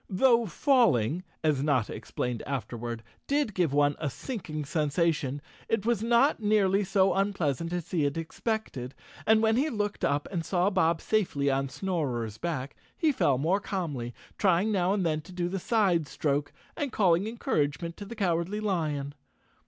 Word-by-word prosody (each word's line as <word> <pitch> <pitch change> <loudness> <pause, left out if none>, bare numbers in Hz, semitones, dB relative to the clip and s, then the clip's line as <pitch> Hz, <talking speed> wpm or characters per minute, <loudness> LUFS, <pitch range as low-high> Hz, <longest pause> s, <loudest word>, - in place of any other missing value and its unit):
Though 235 +3 +4
falling, 180 - +2 0.2
as 150 -4 +2
Notta 140 -6 +1
explained 125 -2 -4
afterward, 120 -3 -4 0.2
did 285 -6 +1
give 175 -6 +1
one 145 0 +3
a 150 - -1
sinking 155 - -5
sensation, 150 -2 0 0.3
it 220 -2 0
was 235 -3 +1
not 235 +5 +3
nearly 205 -2 +3
so 190 0 +3
unpleasant 170 -6 0
as 175 -2 -4
he 175 -4 +1
had 145 +1 0
expected 165 - -3 0.3
and, 220 0 +5
when 220 +1 +3
he 290 +5 +2
looked 205 -5 -3
up 145 +1 +1
and 170 -4 -2
saw 180 +3 +1
Bob 170 -4 +2
safely 165 -10 +1
on 135 0 0
Snorer's 130 - -2
back, 145 -6 -3 0.2
he 320 -3 +3
fell 145 - +2
more 170 +9 +1
calmly, 155 -12 -3 0.3
trying 190 +2 +3
now 185 -2 +2
and 200 -3 +1
then 155 -1 0
to 170 +5 -14
do 180 -1 -2
the 190 +2 -3
side 185 -7 +2
stroke 145 +1 -1 0.2
and 285 -3 -2
calling 185 -1 +3
encouragement 170 -7 -1
to 205 - -7
the 235 - -8
Cowardly 185 0 0
Lion. 155 -9 -1
175 Hz, 165 wpm, -28 LUFS, 145-205 Hz, 0.3 s, and